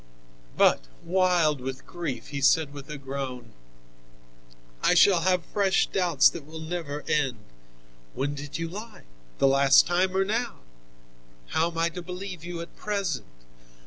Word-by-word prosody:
But, - - +4 0.2
wild 175 -5 +2
with 130 +1 -6
grief, 170 -7 -5
he 140 -1 -4
said 145 +2 +3
with 140 0 -10
a 150 - -5
groan: 130 -4 -6 1.3
"I - - +3
shall 180 0 +6
have 180 -1 +1
fresh 195 -2 +3
doubts 175 -7 +3
that 170 - -8
will 155 +3 -10
never 160 -3 -5
end! 135 -6 +1 0.8
When 140 +2 -1
did 145 +1 -6
you 165 0 -3
lie, 210 +6 -9 0.3
the 135 - +4
last 135 0 +6
time 185 +2 +1
or 195 - +3
now? 225 - -2 0.9
How 165 +2 +1
am 165 - -10
I 165 +1 +2
to 180 +1 -7
believe 180 -1 -7
you 170 -1 -5
at 170 - -10
present? 200 -9 -2
165 Hz, 150 wpm, -26 LUFS, 140-180 Hz, 1.3 s, shall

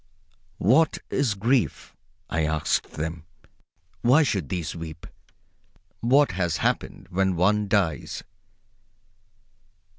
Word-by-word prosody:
What 140 - +3
is 130 -6 +1
grief? 115 - 0 0.3
I 80 0 -1
asked 75 0 0
of - - -25
them. 80 +1 -4 0.8
Why 130 +7 +5
should 95 - -1
these 85 -4 -3
weep? 80 -1 -8 0.9
What 135 +5 +4
has 90 -3 -1
happened - - -2
when 95 0 +1
one 105 +4 +2
dies? 95 -7 0
95 Hz, 100 wpm, -25 LUFS, 80-115 Hz, 0.9 s, Why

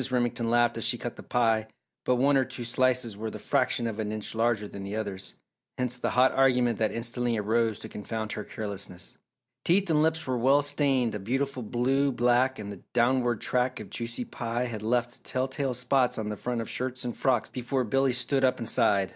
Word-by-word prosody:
Remington 120 -2 0
laughed 120 0 +3
as - - -3
she 120 - +1
cut 120 - -5
the - - -10
pie 115 -2 +1 0.4
but 125 - +3
one 140 +3 +3
or 135 - +4
two 130 -1 -7
slices 125 -2 +1
were 110 +2 -4
the - - -7
fraction 120 - 0
of 110 -1 -3
an 105 -1 -2
inch 110 -1 -5
larger 115 -2 +1
than 100 - -8
the 100 +2 -5
others, 100 -3 -4 0.4
hence 125 -1 -1
the 125 - -2
hot 130 +1 +4
argument 125 -3 +3
that 110 -1 +2
instantly 120 0 -1
arose 110 +1 +1
to 110 - -8
confound 110 0 -5
her 105 +1 -4
carelessness. 100 -4 -7 0.4
Teeth 190 +1 +3
and 150 -1 +4
lips 160 0 +1
were 130 -2 -1
well 135 +4 +4
stained 140 -5 +1
a 105 - -3
beautiful 130 +5 -2
blue 130 +5 +1
black 125 +2 +2
and 105 -1 -6
the 100 - -9
downward 120 -1 +2
track 125 0 0
of - - -9
juicy 120 +1 -4
pie 120 +1 -3
had 115 -4 -5
left 120 +2 -1
telltale 130 0 -1
spots 125 0 +1
on 110 -1 -3
the 105 - -3
front 120 +1 -3
of 115 - -5
shirts 130 0 -3
and 120 - -3
frocks 125 -5 +1
before 125 +1 -1
Billy 135 +3 +2
stood 125 +2 +1
up 130 -1 +3
and 115 - -5
sighed. 100 -4 +3
120 Hz, 210 wpm, -28 LUFS, 110-130 Hz, 0.4 s, or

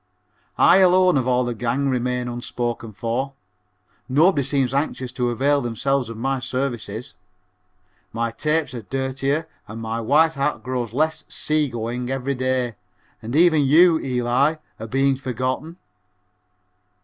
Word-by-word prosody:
I 180 - +6
alone 185 -1 +5
of 130 -2 +1
all 125 0 +2
the 120 - -2
gang 120 +4 -1
remain 125 -1 -1
unspoken 120 -1 -4
for 120 +5 -3 0.8
nobody 150 +4 +4
seems 135 -1 0
anxious 135 -3 -2
to 125 -1 -1
avail 140 +4 +1
themselves 125 +1 -1
of 115 - -7
my 135 +3 -1
services. 125 -3 -4 1.0
My 115 0 -2
tapes 150 +3 -1
are 120 - -5
dirtier 135 +6 -2 0.2
and 110 +1 -8
my 115 +1 -3
white 150 +8 +3
hat 140 +1 -1
grows 125 -3 -3
less 155 +6 0
"sea 155 -2 0
going" 120 +1 -4
every 135 +1 -1
day 130 -3 -1 0.4
and 115 +4 -5
even 160 -1 +5
you, 160 +4 +5
Eli, 130 +3 +1 0.2
are 110 - -6
being 135 +2 +1
forgotten. 130 +6 -3
130 Hz, 135 wpm, -22 LUFS, 120-140 Hz, 1.0 s, I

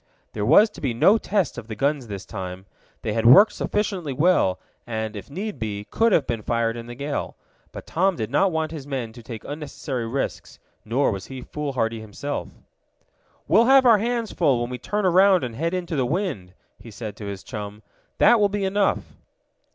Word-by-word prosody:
There 105 -1 -2
was 210 - +6
to - - -12
be 130 -5 -1
no 200 - +5
test 200 -6 -1
of 110 - -12
the 110 - -6
guns 140 +2 0
this 100 -3 -7
time. 95 -2 -7 0.4
They 105 - -1
had 115 0 0
worked 200 - +8
sufficiently 195 -8 -2
well, 145 - +2 0.3
and, 110 -2 -3
if 100 - -8
need 200 +8 -5
be, 105 -2 -4
could 230 0 +3
have 155 -7 +3
been 115 -2 -3
fired 115 +1 0
in 115 0 -8
the 120 - -8
gale. 140 +3 -4 0.4
But - - -9
Tom 190 +3 +1
did 110 0 -4
not 185 +7 +3
want 160 -1 -1
his 150 -4 -7
men 125 -5 -4
to 120 - -11
take 115 -1 -8
unnecessary 145 -5 -5
risks, 135 +4 -4 0.3
nor 125 +5 +1
was 95 -1 -6
he 130 -1 -8
foolhardy 130 -7 -2
himself. 110 +7 -5 1.0
"We'll 210 +9 +5
have 265 +1 +6
our 230 -4 +6
hands 230 -1 -1
full 140 -8 +2
when 120 +1 -3
we 125 - -5
turn 205 - -2
around 185 -1 +5
and 120 -2 -4
head 165 +7 -1
into 175 -3 -3
the 135 - +1
wind," 145 - -3 0.2
he 115 - -12
said 105 -1 -7
to 105 - -8
his 100 -1 -6
chum. 105 -2 -7 0.3
"That 240 - +6
will 205 -1 +3
be 200 0 -2
enough." 195 +1 0
135 Hz, 200 wpm, -23 LUFS, 115-185 Hz, 1.0 s, worked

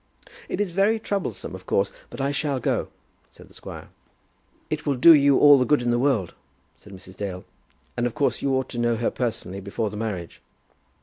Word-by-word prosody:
"It - - -3
is 205 -3 -1
very 200 +5 +2
troublesome, 195 - -4
of 95 0 -10
course; 100 0 +1 0.2
but - - -10
I 135 +1 0
shall 140 -2 -1
go," - - -1 0.4
said - - -17
the - - -20
squire. - - -10 0.8
"It 155 0 -2
will 145 -3 0
do 165 +7 +8
you 140 -2 +5
all 145 -2 +7
the - - +3
good 125 +1 +2
in 120 - +1
the 120 - +1
world," 120 -9 +1 0.4
said 105 - -16
Mrs. 95 -1 -12
Dale; 95 -3 -5 0.5
"and 120 0 0
of 120 - -7
course 140 - 0
you 140 - 0
ought 130 0 -1
to 120 - -5
know 120 0 +1
her 115 +1 -1
personally 110 -6 -4
before 100 +2 -3
the 105 - -7
marriage." 100 -6 -5
120 Hz, 205 wpm, -24 LUFS, 100-145 Hz, 0.8 s, do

